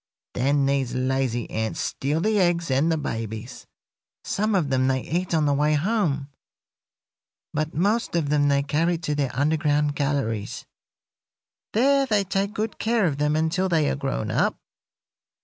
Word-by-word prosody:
Then 140 +2 +2
these 135 -2 0
lazy 130 -2 0
ants 110 0 -2
steal 145 +4 -1
the 215 +2 +2
eggs 175 -4 +1
and 140 +5 +2
the 160 - +1
babies. 110 -6 -5 0.6
Some 215 +1 0
of 155 -7 +1
them 130 0 +2
they 130 -1 +1
eat 175 +6 -2
on 155 -2 +2
the 145 - +2
way 150 +2 +2
home, 150 -5 0 1.2
but 155 +1 -2
most 205 +5 +1
of 160 -4 0
them 145 -1 +3
they 140 0 +2
carry 165 +5 +1
to 160 -3 -3
their 145 -3 0
underground 150 0 +1
galleries. 135 -8 -2 1.1
There 275 +4 +3
they 210 -4 +2
take 195 +2 -2
good 215 +1 -3
care 225 -2 +2
of 145 -4 -1
them 150 +1 +1
until 165 +4 +1
they 160 -4 +2
are - - -1
grown 135 -6 -3
up. - - +1
150 Hz, 160 wpm, -24 LUFS, 135-175 Hz, 1.2 s, them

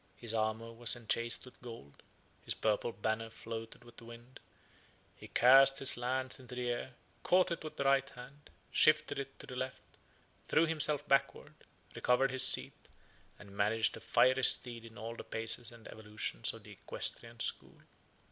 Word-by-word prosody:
His 115 -2 -5
armor 110 +1 -2
was 120 +1 +4
enchased 115 +1 -1
with 125 - -16
gold; 115 - -11 0.4
his - - -2
purple 110 +2 0
banner 115 0 -3
floated 115 +1 -8
with 120 -1 -17
the 115 - -12
wind: 120 +2 -13 0.8
he - - -12
cast 135 +2 +6
his 135 -1 0
lance 130 +2 -2
into 125 -1 -10
the 125 -1 -2
air; 120 +1 -5 0.3
caught 185 0 +3
it 170 - -3
with 155 - -8
the - - -1
right 135 0 +3
hand; 135 +3 -13 0.2
shifted 155 -2 +3
it 135 0 -7
to - - -10
the - - -9
left; 130 0 -5 0.6
threw 160 - +3
himself 150 -2 +1
backwards; 135 0 +1 0.4
recovered 130 +2 +2
his 130 -1 -1
seat; - - +2 0.6
and 100 -1 -14
managed 110 +2 +1
a - - -9
fiery 130 +1 +3
steed 120 -2 +2
in 115 0 -13
all 115 +2 -6
the - - -8
paces 115 +1 -3
and 115 -1 -14
evolutions 105 -1 -2
of - - -12
the - - -13
equestrian - - -5
school. - - -4
120 Hz, 170 wpm, -33 LUFS, 115-135 Hz, 0.8 s, cast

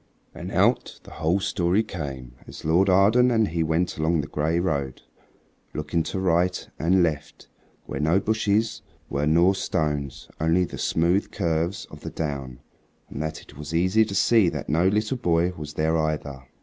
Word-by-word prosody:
And - - -7
out - - +1
the - - -14
whole 80 +5 0
story 95 +2 +1
came 70 - -7
as - - -10
Lord 90 +5 +3
Arden 105 +7 +5
and 110 -3 +2
he 85 0 -1
went 80 +2 0
along 80 +1 +1
the 70 - -7
gray 80 +3 0
road, 70 -7 -2 0.7
looking 75 +2 -1
to 95 - -3
right 90 0 +1
and 90 +3 +3
left 75 -3 -3 0.4
where - - -5
no 80 +5 +3
bushes 110 +1 0 0.3
were 70 +1 0
nor 85 +5 +4
stones, 75 -7 -2
only 80 +3 +2
the - - -8
smooth 85 +5 +1
curves 85 -1 -1
of - - -10
the - - -6
down, 70 -5 -5 0.5
so - - -6
that 80 -1 -4
it - - -17
was 75 +2 -5
easy 95 +6 +3
to 100 -2 -6
see 105 -1 +4
that - - -6
no 85 +4 +3
little 105 +6 0
boy 85 -4 +1
was 75 -1 -8
there 80 +1 +1
either. 75 -4 -2
85 Hz, 175 wpm, -24 LUFS, 75-95 Hz, 0.7 s, Arden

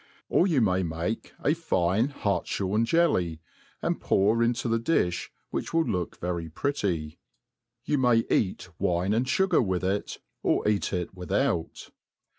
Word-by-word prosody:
Or 180 - +4
you 155 -8 +2
may 95 -3 +2
make 85 +5 -3
a 150 - +4
fine 110 - +1
hartihorn 100 -3 -1
jelly, 95 - +2 0.4
and - - -1
pour 105 +4 +3
into 120 +1 +1
the 115 0 +1
difli, 110 - 0 0.2
which - - -3
will 165 -1 +3
look 90 - -2
very 85 -2 -3
pretty, 85 - -2 0.7
sou 150 - +1
may 120 -3 +4
eat^ 95 -2 0
wine 90 +3 +1
and 120 +4 +1
fugar 190 +3 +3
with 95 -3 -1
it, 95 +2 -1 0.2
or - - +1
eat 105 -2 +1
it 90 -1 -3
without. 90 -2 -2
100 Hz, 145 wpm, -27 LUFS, 90-120 Hz, 0.7 s, Or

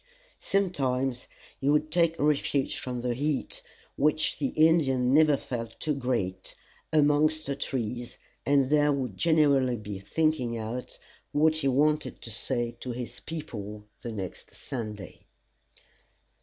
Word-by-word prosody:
Sometimes 135 -10 0 0.3
he 140 - +1
would 150 +1 +2
take 165 -1 +3
refuge 145 -2 +1
from 125 -1 -4
the 125 0 0
heat, 145 +3 -2 0.3
which 150 +2 +1
the 140 - +1
Indian 135 -5 +3
never 150 -1 +5
felt 115 -4 -6
too 155 - 0
great, 115 -9 -2 0.4
amongst 155 +1 +3
the 140 - -2
trees, 120 -3 -4 0.3
and 140 -1 +3
there 150 -1 +4
would 130 -8 -2
generally 140 - +3
be 105 -2 -6
thinking 125 +2 0
out 115 +3 -5 0.4
what 155 +1 +3
he 145 -3 0
wanted 150 +3 +1
to 115 - -6
say 120 +1 -2
to 125 - -4
his 120 0 -6
people 105 -10 -7 0.2
the 120 - -5
next 95 -4 -7
Sunday. 105 - -7
135 Hz, 130 wpm, -28 LUFS, 120-150 Hz, 0.4 s, never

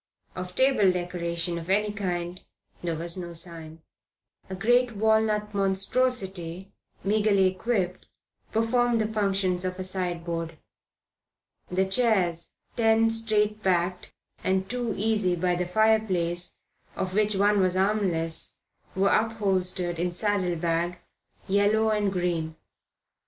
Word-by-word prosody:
Of 185 0 -6
table 260 -8 +4
decoration 170 -1 -2
of 165 +2 -9
any 210 +2 +2
kind 180 -3 -3 0.4
there 170 -2 -2
was 170 +2 -2
no 175 -2 -6
sign. 165 -1 -4 0.7
A 190 - -4
great 240 +4 +2
walnut 215 0 +1
monstrosity 195 -3 0 0.3
meagrely 205 -1 +3
equipped 185 -2 -2 0.4
performed 235 +1 +2
the 215 - +1
functions 195 -4 0
of 185 0 -3
a 185 - -4
sideboard. 170 -3 -3 1.1
The 190 +1 +1
chairs, 190 -6 +1 0.2
ten 225 0 +3
straight 215 -1 +1
backed, 180 -2 0 0.3
and 190 0 0
two 245 -1 -2
easy 210 -4 +1
by 180 +1 +1
the 175 0 -1
fireplace, 185 -4 +1 0.4
of 185 -1 -3
which 210 0 +2
one 205 +1 +3
was 185 -1 +2
armless, 185 -5 0 0.4
were 195 +1 +3
upholstered 190 -5 0
in 175 +1 0
saddlebag, 175 -3 0 0.5
yellow 205 +3 +3
and 210 -2 +1
green. 170 -3 -2
190 Hz, 115 wpm, -26 LUFS, 175-215 Hz, 1.1 s, table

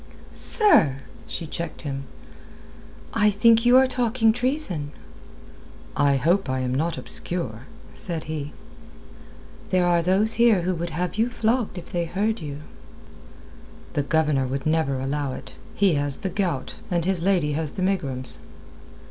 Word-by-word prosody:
"Sir!" 360 - +4 0.3
she 170 - -4
checked 165 +1 -5
him. 135 -2 -4 1.1
"I 210 - +4
think 230 +3 +4
you 250 +1 +7
are 265 - +6
talking 240 -3 +2
treason." 245 - -2 1.0
"I 140 -1 +3
hope 165 +5 +1
I 130 0 -1
am 125 0 -1
not 160 +5 -1
obscure," 130 -9 -3 0.3
said 170 -3 -4
he. 150 -2 -5 1.2
"There 185 -1 +2
are 175 -1 +3
those 195 +6 +3
here 225 -6 +5
who 185 +1 0
would 170 0 -3
have 180 +5 -3
you 230 +2 +3
flogged 230 -3 0
if 175 - -9
they 175 -1 -1
heard 210 +5 -1
you." 145 -1 -6 1.3
"The 145 - +1
Governor 150 -2 +1
would 135 +1 -4
never 155 -4 +1
allow 140 0 -2
it. - - -9 0.2
He 195 -3 +3
has 145 -2 0
the 190 - -4
gout, 175 -9 -2
and 170 -2 0
his 190 -2 +1
lady 175 -5 +2
has 155 0 -2
the 185 - -3
megrims." 130 - -2
170 Hz, 150 wpm, -24 LUFS, 145-200 Hz, 1.3 s, you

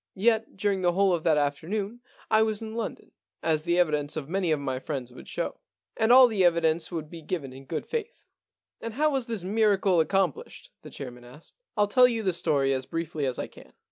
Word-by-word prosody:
Yet 220 +2 +1
during 195 -1 0
the 175 -1 +2
whole 195 0 +3
of 165 -2 -1
that 160 -3 +4
afternoon 195 +11 -2 0.3
I 215 - +5
was 220 -1 +1
in 220 -1 -7
London, 230 -1 -5 0.3
as 160 -2 +1
the 170 +2 0
evidence 150 -4 +1
of 145 -3 -4
many 185 +1 -1
of 155 - +2
my 130 -2 -3
friends 130 -3 -5
would - - -12
show. - - -4 0.4
And 220 +1 +2
all 255 +1 +10
the 210 -5 +1
evidence 165 -1 +2
would 160 -3 -4
be 165 +1 -10
given 150 -5 -4
in 135 +1 -12
good 155 - -4
faith.* 465 +1 -5 0.3
* - - -50
And 230 -1 -6
how 305 +2 +2
was 265 -3 -1
this 225 -6 -2
miracle 200 -2 +2
accomplished? 180 -1 -1
* - - -59
the - - -11
chairman 125 -3 -8
asked. 130 +6 -15
* - - -51
ril 210 - +4
tell 250 +5 +6
you 230 -3 -2
the 190 -3 +1
story 140 -5 +1
as 130 -1 -3
briefly 165 -3 -3
as 130 - -2
I - - -2
can. - - -16
175 Hz, 230 wpm, -27 LUFS, 150-215 Hz, 0.4 s, all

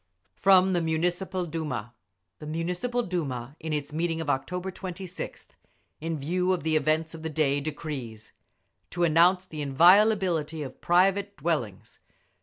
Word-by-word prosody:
FROM 190 -1 +5
THE 175 - +2
MUNICIPAL 175 +3 -1
DUMA 150 -9 -4 0.5
The 150 - -8
Municipal 180 +10 -2
Duma 140 - -4
in 160 0 -5
its 150 0 -3
meeting 165 +1 -1
of 155 -3 0
October 180 +8 -3
26th, 185 0 -7 0.5
in 165 +1 -3
view 180 +6 0
of 180 - -3
the 160 0 +1
events 155 +1 +1
of 165 - -9
the 160 - -4
day 145 -2 +1
decrees: 140 -7 -6 0.6
To 175 - -2
announce 175 +3 +4
the 155 -4 -7
inviolability 170 0 +4
of 135 - -9
private 195 +3 +2
dwellings. 140 - -3
165 Hz, 140 wpm, -27 LUFS, 150-180 Hz, 0.6 s, FROM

